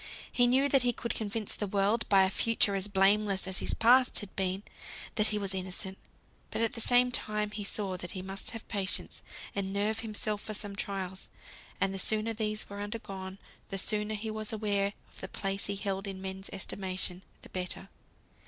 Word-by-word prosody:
He 245 -1 +5
knew 265 +3 +5
that 275 -1 +5
he 245 0 +3
could 235 - -2
convince 215 -1 -2
the 205 - -2
world, 200 +4 +2
by 195 -1 +7
a 190 - +2
future 225 -1 +3
as 195 0 +1
blameless 200 0 +3
as 190 0 +1
his - - +1
past 250 +3 +6
had 205 - -3
been, 190 +1 0 0.5
that 215 0 +4
he 210 - +1
was 195 -2 0
innocent. 190 +1 -4 0.5
But - - 0
at 230 - +2
the 230 - -3
same 245 +1 +5
time 210 -3 0
he 210 0 -3
saw 195 -2 -1
that 175 0 -5
he 185 - -4
must 195 +1 -5
have 225 -2 -7
patience, 200 -3 -3 0.3
and 195 -1 -1
nerve 210 +3 +1
himself 215 -1 -2
for 215 - -3
some 205 -1 -3
trials; 190 -2 -2 0.5
and 195 0 +2
the 195 - -2
sooner 215 +3 +1
these 215 -1 -1
were 200 0 -6
undergone, 195 -3 -5 0.3
the 195 - -2
sooner 210 +2 +1
he 215 +1 -3
was 215 0 -3
aware 205 -2 +1 0.2
of - - -14
the 190 - -4
place 195 0 -2
he 200 - -1
held 195 0 -2
in 195 -1 -4
men's 190 0 -6
estimation, 185 -2 -1 0.2
the - - -11
better. 185 +1 -3
200 Hz, 200 wpm, -31 LUFS, 195-215 Hz, 0.5 s, by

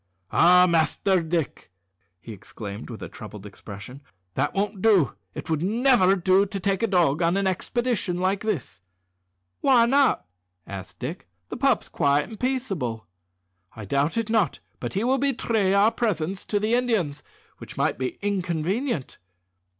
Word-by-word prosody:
"Ah! 180 +1 +6
Master 175 +3 +2
Dick," 165 -3 -3 0.5
he 115 - -9
exclaimed 105 +1 -8
with 115 - -8
a - - -5
troubled 105 -2 -10
expression, 105 +6 -10 0.3
"that - - 0
won't 200 0 -1
do. 190 - +4 0.2
It - - -6
would 160 -2 -1
never 220 -1 +4
do 190 +2 +3
to 195 0 -5
take 195 +1 0
a 230 - +2
dog 175 -6 +2
on 170 +3 +2
an 200 - 0
expedition 190 0 -1
like 190 +2 0
this." 165 - -4 0.8
"Why 250 -4 +5
not?" 265 - +3 0.4
asked 95 -2 -8
Dick; - - -6 0.2
"the - - -5
pup's 275 +2 +2
quiet 145 -2 +1
and 220 - -10
peaceable." 195 - -2 0.7
"I 110 - -8
doubt 140 - 0
it 225 -1 -1
not; 220 -6 +2 0.2
but - - -5
he 200 - 0
will 260 +2 +2
betray 230 -7 +1
our 205 +3 +5
presence 190 -6 -2
to 205 - 0
the 215 +3 0
Indians, 215 - 0 0.4
which - - -11
might - - 0
be 130 -1 -3
inconvenient." 185 - -2
185 Hz, 155 wpm, -25 LUFS, 145-220 Hz, 0.8 s, Ah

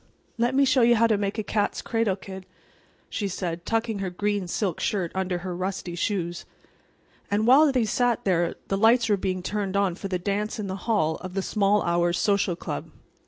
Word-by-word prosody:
"Let 240 +3 +1
me 275 +1 +5
show 265 -1 +3
you 235 0 +5
how 230 +1 +4
to 225 -2 +3
make 200 +1 -2
a 215 - -1
cat's 205 0 -1
cradle, 225 -4 0
kid," 190 -1 -10 0.6
she 205 - -3
said, 175 -2 -4
tucking 225 -2 0
her 195 -1 -2
green 205 +1 -1
silk 180 -1 -2
skirt 185 -5 -1
under 190 -1 -1
her 180 -1 -3
rusty 185 -1 -4
shoes. 175 -1 -2 0.9
And 210 +2 +1
while 280 +5 +6
they 250 -4 +1
sat 245 +1 +1
there 175 -3 +1
the 195 - +1
lights 230 +2 +4
were 205 - +4
being 185 -2 -3
turned 200 0 -2
on 200 -3 +2
for 195 +3 -6
the 185 -1 -1
dance 200 +4 -2
in 210 - -4
the 190 -1 -4
hall 160 -8 +2
of 185 0 -8
the 195 - 0
Small 205 0 +2
Hours 175 +1 +1
Social 200 -3 +1
Club. - - -5
200 Hz, 205 wpm, -25 LUFS, 185-220 Hz, 0.9 s, while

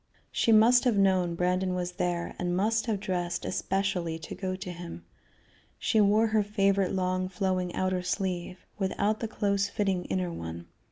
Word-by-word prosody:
She 230 - +2
must 230 +3 +6
have 235 -5 +3
known 185 -3 +3
Brandon 180 +1 0
was 180 -1 -2
there, 175 -1 -2
and 180 0 -1
must 225 +4 +1
have 215 -3 0
dressed 180 -3 -2
especially 190 -4 -1
to 160 - -8
go 185 -1 -3
to 185 -1 -6
him. 170 - -8 0.7
She 220 - +2
wore 210 +2 +4
her 220 -1 +2
favorite 200 -2 +1
long 185 0 0
flowing 185 -2 -1
outer 185 -1 0
sleeve, 180 -1 -3
without 205 +2 0
the 225 - -2
close 200 -2 0
fitting 195 -3 -1
inner 180 -2 -2
one. 85 - -6
185 Hz, 165 wpm, -28 LUFS, 180-200 Hz, 0.7 s, must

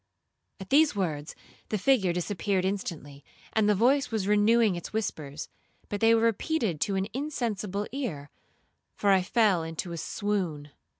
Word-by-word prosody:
At 190 - -10
these 295 -2 +5
words 155 -6 -3 0.3
the 215 - 0
figure 205 -4 +3
disappeared 185 +2 -1
instantly, 160 -8 -4 0.3
and 215 -1 +3
the 210 - +4
voice 270 +7 +3
was 215 -4 -2
renewing 210 0 +4
its 175 - -7
whispers, 155 -9 -4 0.4
but 205 - -4
they 225 0 +6
were 225 - +2
repeated 230 - 0
to 200 - +1
an 190 0 0
insensible 220 -8 -2
ear, 190 - -4 0.6
for 200 - +2
I 190 -1 +5
fell 200 -2 +2
into 165 +2 -5
a 170 - -5
swoon. 175 -7 -3
200 Hz, 155 wpm, -28 LUFS, 175-225 Hz, 0.6 s, they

